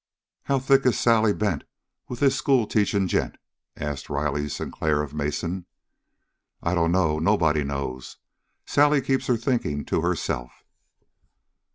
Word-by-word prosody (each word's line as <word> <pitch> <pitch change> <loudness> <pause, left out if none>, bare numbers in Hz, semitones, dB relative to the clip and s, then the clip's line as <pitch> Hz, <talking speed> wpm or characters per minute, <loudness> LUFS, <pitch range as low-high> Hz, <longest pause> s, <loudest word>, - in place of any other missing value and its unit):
"How 140 - +1
thick 135 0 +3
is 125 - +2
Sally 115 -2 +4
Bent 100 -7 -1 0.4
with 125 - -7
this 135 -1 +4
schoolteaching 110 -8 +1
gent?" - - -1 0.4
asked 75 -2 -5
Riley 75 0 -1
Sinclair 75 0 -1
of 75 -1 -8
Mason. 85 +5 -3 1.0
"I 85 - 0
dunno. 85 -2 +2
Nobody 80 -4 +2
knows. 70 -2 -5 0.5
Sally 145 0 +3
keeps 135 0 -1
her 125 - +2
thinking 115 - -1
to - - 0
herself." - - -3
90 Hz, 125 wpm, -25 LUFS, 75-120 Hz, 1.0 s, Sally